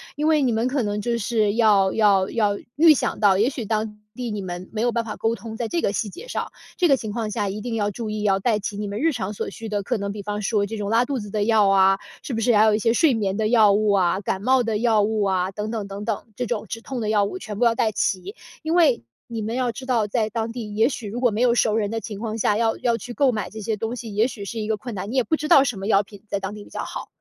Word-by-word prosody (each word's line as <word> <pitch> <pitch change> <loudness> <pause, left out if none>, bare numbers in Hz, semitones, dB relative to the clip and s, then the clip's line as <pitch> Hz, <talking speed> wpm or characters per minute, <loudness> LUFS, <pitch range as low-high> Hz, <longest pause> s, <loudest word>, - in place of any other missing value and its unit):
因 295 - -2
为 310 -1 +4
你 255 -3 +2
们 225 +2 +1
可 270 +1 0
能 205 -2 -2
就 235 +2 -1
是 215 -2 +1
要 205 -4 +4
要 200 -3 +3
要 205 -3 +1 0.2
预 315 0 +7
想 - - -2
到 200 -3 +4
也 215 +4 +3
许 260 -3 -5
当 215 0 -2 0.2
地 245 -1 -4
你 210 -1 -3
们 180 0 -6
没 215 - -2
有 240 +1 +2
办 235 0 -1
法 215 - -5
沟 225 +1 0
通， 220 +1 -8
在 235 - -2
这 345 - 0
个 200 - 0
细 210 - -2
节 455 - -11
上， - - -4 0.3
这 360 - +3
个 275 - +5
情 220 -4 -5
况 225 -2 -3
下， 210 -2 -1
一 205 +2 -5
定 235 +1 -3
要 205 -2 0
注 225 +1 -5
意 215 0 -3
要 195 -2 +3
带 215 +1 +1
齐 205 0 -4
你 210 - -3
们 200 +1 -4
日 325 +2 +3
常 205 -5 -3
所 - - -4
需 225 -1 -8
的， 205 -1 -1
可 245 +4 -1
能 200 -1 -3
比 205 0 -6
方 210 +1 -4
说 210 -1 +1
这 220 +2 -5
种 205 -1 -3
拉 230 +3 +3
肚 270 0 -2
子 205 -2 -7
的 210 0 -1
药 220 -2 +4
啊， 195 0 +5 0.2
是 265 - -6
不 225 - -1
是 235 +2 +3
还 210 +1 +6
有 215 -1 +4
一 - - 0
些 225 +1 +2
睡 285 +3 +4
眠 200 -4 -1
的 220 -1 +1
药 220 -3 +5
物 210 0 +2
啊， 190 -2 +2
感 190 -1 -2
冒 260 +4 +3
的 225 -2 -1
药 225 -2 +3
物 215 0 0
啊， 190 -1 0
等 210 +2 -4
等 215 -3 -3
等 200 +1 -7
等。 220 -3 -2
这 250 - -2
种 220 -2 -3
止 225 +4 -6
痛 260 +1 -5
的 215 - -2
药 210 -1 +3
物 370 - -5
全 210 - -7
部 - - +2
要 230 -1 +3
带 225 -1 +1
齐。 190 +1 -1 0.3
因 315 +1 -2
为 320 - +4 0.2
你 230 -2 -4
们 220 +2 -3
要 250 -1 0
知 255 +3 -9
道， 240 -4 +1
在 215 +1 0
当 225 +1 -3
地， 225 -3 -6
也 225 +4 +4
许 235 -6 -6
如 220 +4 -4
果 245 -3 +3
没 210 - -3
有 245 -1 +4
熟 220 -2 +2
人 210 -2 0
的 225 0 -2
情 205 -1 -7
况 220 0 -3
下， 210 -1 +2
要 225 0 +1
要 235 -2 +1
去 240 +3 -8
购 275 0 +3
买 215 -3 -3
这 220 +1 -8
些 215 +1 -2
东 225 +3 -3
西， 230 -4 -7
也 215 +4 +3
许 220 -5 -8
是 225 +3 -5
一 215 - -3
个 220 - +1
困 230 +2 -7
难。 195 +2 -5
你 - - -4
也 260 - +3
不 315 - +1
知 305 - -4
道 275 - +7
什 245 -6 -2
么 195 +1 -5
药 205 -2 +4
品 200 0 -15
在 200 - -2
当 195 +1 -4
地 210 - -9
比 - - -16
较 - - -5
好， - - -6
220 Hz, 335 characters per minute, -23 LUFS, 205-235 Hz, 0.3 s, 预